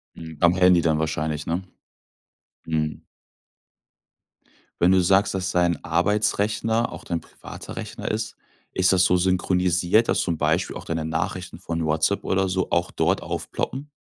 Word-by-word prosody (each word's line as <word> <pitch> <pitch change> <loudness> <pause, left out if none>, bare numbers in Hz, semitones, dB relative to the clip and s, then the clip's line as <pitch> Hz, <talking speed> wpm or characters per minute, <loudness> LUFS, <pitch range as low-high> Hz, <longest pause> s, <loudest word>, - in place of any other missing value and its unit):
Mhm. 80 -2 -9
Am 85 0 +5
handy 90 -1 +5
dann 80 -2 +1
wahrscheinlich, 75 -1 -2
ne? 85 +3 -1 1.0
Mhm. 75 -1 -2 1.8
Wenn 90 +2 +6
du 95 -1 +4
sagst, 100 +3 +3
dass 90 -1 -1
dein 85 -3 +1
Arbeitsrechner 105 +4 +1
auch - - -9
dein 85 -2 -2
privater - - -11
Rechner - - -5
ist, 110 -1 -3 0.4
ist 95 0 +3
das 90 0 +4
so 90 0 +3
synchronisiert, 90 +2 +2
dass - - +2
zum 85 -3 -1
Beispiel 80 +5 0
auch - - -8
deine 80 -1 -2
Nachrichten 90 +3 -3
von 85 -3 -3
WhatsApp 80 +5 +1
oder 95 0 +1
so, 95 0 -1
auch 85 +1 +1
dort - - 0
aufploppen? 140 +2 -4
90 Hz, 150 wpm, -24 LUFS, 80-95 Hz, 1.8 s, Wenn